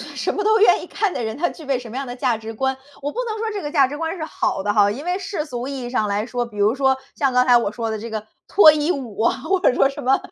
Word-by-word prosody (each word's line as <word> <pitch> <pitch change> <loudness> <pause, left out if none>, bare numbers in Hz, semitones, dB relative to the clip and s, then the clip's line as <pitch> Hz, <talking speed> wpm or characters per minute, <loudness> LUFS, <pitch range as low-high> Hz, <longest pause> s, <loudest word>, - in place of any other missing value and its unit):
什 - - -1
么 410 - -2
都 435 +1 +4
愿 400 -4 +5
意 355 - -9
干 410 -3 -1
的 - - -3
人， 220 +3 -4
他 345 +2 +1
具 315 - -11
备 270 -2 +1
什 245 -2 -9
么 225 - -9
样 275 0 -4
的 245 - -6
价 245 -3 0
值 225 0 -8
观。 265 +3 -1 0.2
我 290 +1 -3
不 480 - -6
能 440 -1 -3
说 445 0 -2
这 410 -2 -4
个 295 - -5
价 280 -4 +5
值 290 - -6
观 325 +3 -3
是 320 - -5
好 295 -9 -2
的 205 +1 0
哈。 205 -1 +4
因 265 +8 -6
为 360 +1 0
世 380 -5 -3
俗 250 -3 -5
意 275 -2 -5
义 240 - -5
上 220 -4 0
来 205 +1 -1
说， 245 0 -2
比 225 -3 -13
如 205 +2 +3
说 265 0 +2 0.2
像 275 -3 +1
刚 250 0 +4
才 245 -1 +6
我 230 -4 -1
说 230 0 -3
的 220 - -3
这 230 +2 -7
个 215 -1 -5 0.2
脱 380 -6 +8
衣 305 +2 0
舞 245 - -4
啊， 230 - +2
或 365 +6 0
者 305 - +3
说 270 - +3
什 285 +1 -7
么 265 +2 +4
265 Hz, 350 characters per minute, -21 LUFS, 230-320 Hz, 0.2 s, 脱